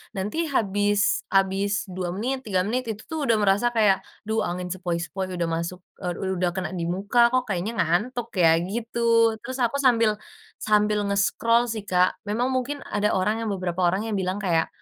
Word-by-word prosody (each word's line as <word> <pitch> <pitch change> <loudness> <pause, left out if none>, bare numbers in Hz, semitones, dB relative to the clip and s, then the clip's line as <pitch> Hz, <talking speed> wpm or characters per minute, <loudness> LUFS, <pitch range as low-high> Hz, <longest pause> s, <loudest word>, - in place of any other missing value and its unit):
Nanti 200 +9 -3 0.2
habis 205 0 +2
habis 195 +1 +2 0.2
2 185 -1 -4
menit, 260 +6 -2
3 185 -2 +1
menit, 250 +4 -1
itu 215 0 -9
tuh 320 - -2
udah 225 - +4
merasa 205 +3 +3
kayak, 205 -4 +4 0.3
duh, 220 0 +1
angin 180 +1 -3
sepoi-sepoi 180 +1 -3
udah 170 - 0
masuk, 170 +2 -4 0.2
eee, 180 -1 -1
u - - -3 0.2
udah 180 -1 +2
kena 180 -4 -3
dimuka, 190 +7 -1
kok 255 -1 +3
kayaknya 195 +3 -2
ngantuk, 230 +8 0
ya, 165 -1 +6
gitu. 230 +4 -4 0.4
Terus 260 +2 -6
aku 255 +5 -1
sambil 230 -4 +4 0.4
sambil 210 0 +2
nge-scroll 230 +4 +2
sih, 220 -3 -4
Kak. 180 -1 +2
Memang 240 +4 0
mungkin 260 +3 -2
ada 210 0 0
orang 210 +4 +1
yang 220 - -2
beberapa 185 -1 -3
orang 195 +5 0
yang 210 - -1
bilang 185 +2 -2
kayak, 165 -3 +2
200 Hz, 180 wpm, -25 LUFS, 185-225 Hz, 0.4 s, ya